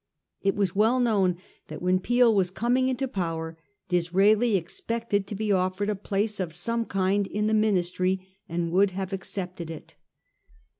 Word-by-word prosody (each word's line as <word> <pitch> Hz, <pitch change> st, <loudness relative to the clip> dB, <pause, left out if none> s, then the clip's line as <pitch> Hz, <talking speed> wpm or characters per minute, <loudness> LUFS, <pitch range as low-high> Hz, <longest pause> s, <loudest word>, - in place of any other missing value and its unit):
It 195 Hz, 0 st, +1 dB
was 195 Hz, -3 st, 0 dB
well 225 Hz, +5 st, +3 dB
known 200 Hz, -7 st, +2 dB, 0.3 s
that -, -, -7 dB
when 180 Hz, +1 st, +2 dB
Peel 240 Hz, +3 st, +4 dB
was 190 Hz, -3 st, +2 dB
coming 245 Hz, +6 st, +1 dB
into 260 Hz, +1 st, -1 dB
power 165 Hz, -6 st, -3 dB, 0.3 s
Disraeli 195 Hz, +6 st, +3 dB
expected 205 Hz, +3 st, -2 dB
to 205 Hz, -, -5 dB
be 210 Hz, +1 st, -1 dB
offered 185 Hz, +2 st, 0 dB
a 210 Hz, -, 0 dB
place 205 Hz, +2 st, -1 dB
of 170 Hz, -4 st, -3 dB
some 230 Hz, +6 st, 0 dB
kind 195 Hz, 0 st, 0 dB
in 210 Hz, +1 st, -2 dB
the 215 Hz, -, +1 dB
Ministry, 185 Hz, -3 st, +1 dB, 0.2 s
and 170 Hz, 0 st, -2 dB
would 195 Hz, +3 st, +4 dB
have 195 Hz, 0 st, -3 dB
accepted 180 Hz, -3 st, -5 dB
it. 160 Hz, -2 st, -9 dB
195 Hz, 160 wpm, -26 LUFS, 180-215 Hz, 0.3 s, Peel